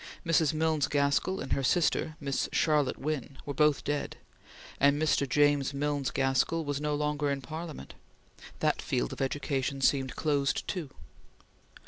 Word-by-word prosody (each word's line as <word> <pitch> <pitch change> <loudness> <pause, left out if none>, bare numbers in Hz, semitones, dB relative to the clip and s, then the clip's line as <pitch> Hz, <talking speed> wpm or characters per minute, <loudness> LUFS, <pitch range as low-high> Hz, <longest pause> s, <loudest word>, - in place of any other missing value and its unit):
Mrs. 165 -3 +3
Milnes 155 -2 +1
Gaskell 140 +6 +1
and 135 - -2
her - - 0
sister 155 +2 +1
Miss 140 -2 -2
Charlotte 150 -4 +2
Wynn 140 -2 -4
were 145 - -4
both 150 0 +3
dead, 145 0 -3 0.6
and 140 +1 +4
Mr. 150 -3 +1
James 145 0 +2
Milnes 145 -1 -1
Gaskell 135 +5 +1
was 145 0 -2
no 150 0 0
longer 150 0 -1
in 140 0 -1
Parliament. 160 +3 -7 0.7
That - - +1
field - - -1
of - - -7
education 135 0 -1
seemed 135 -1 +1
closed 140 -3 0
too. 175 -7 -3
145 Hz, 145 wpm, -29 LUFS, 140-155 Hz, 0.7 s, and